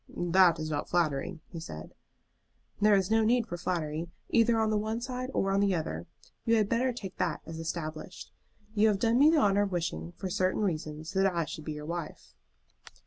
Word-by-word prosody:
"That 175 -1 +4
is 155 0 -4
not 145 -1 -2
flattering," 165 0 0
he 170 - -7
said. 80 - -8 0.9
"There 210 0 +5
is 195 +1 +1
no 225 0 +4
need 235 +1 +3
for 220 - -5
flattery, 165 -2 -2 0.2
either 230 0 +4
on 220 -1 +2
the 215 - +2
one 220 +2 -2
side 255 +1 -4
or 195 -6 0
on 195 - +2
the 200 -2 +3
other. 85 - -4 0.4
You 230 - +3
had 215 -2 +3
better 250 +3 +2
take 200 -6 -8
that - - -1
as 160 0 -7
established. 160 -2 -5 0.4
You 220 0 +4
have 210 -2 +3
done 230 +4 +2
me 295 +2 +7
the 325 - +4
honor 205 -7 +4
of 205 -1 0
wishing, 85 - -3
for 190 - -5
certain 185 +3 +1
reasons, 155 -2 -3
that 195 0 +3
I 170 -2 -1
should 155 0 -7
be 155 - -3
your 150 0 -7
wife." 155 - -6
185 Hz, 205 wpm, -30 LUFS, 160-215 Hz, 0.9 s, me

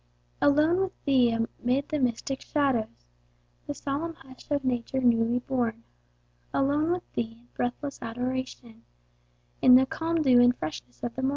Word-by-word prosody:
Alone 305 +5 +4
with 385 -1 -4
Thee, 260 -4 +4
amid 240 +4 -1
the 305 - -1
mystic 255 +1 -1
shadows, 250 - -1 0.6
The - - -3
solemn 305 +4 -3
hush 260 -4 -16
of 285 -2 0
nature 250 +1 -1
newly 235 -1 +3
born; 240 -3 -2 0.7
Alone 290 +4 +2
with 360 - -3
Thee 230 -1 -3
in 245 - -27
breathless 260 +3 -3
adoration, 245 -1 -5 0.8
In 250 - +8
the 260 +1 +6
calm 325 +3 -1
dew 250 -3 +6
and 245 0 +4
freshness 140 -5 -7
of 240 - -3
the 265 - -3
morn. 265 - +1
255 Hz, 155 wpm, -27 LUFS, 235-285 Hz, 0.8 s, In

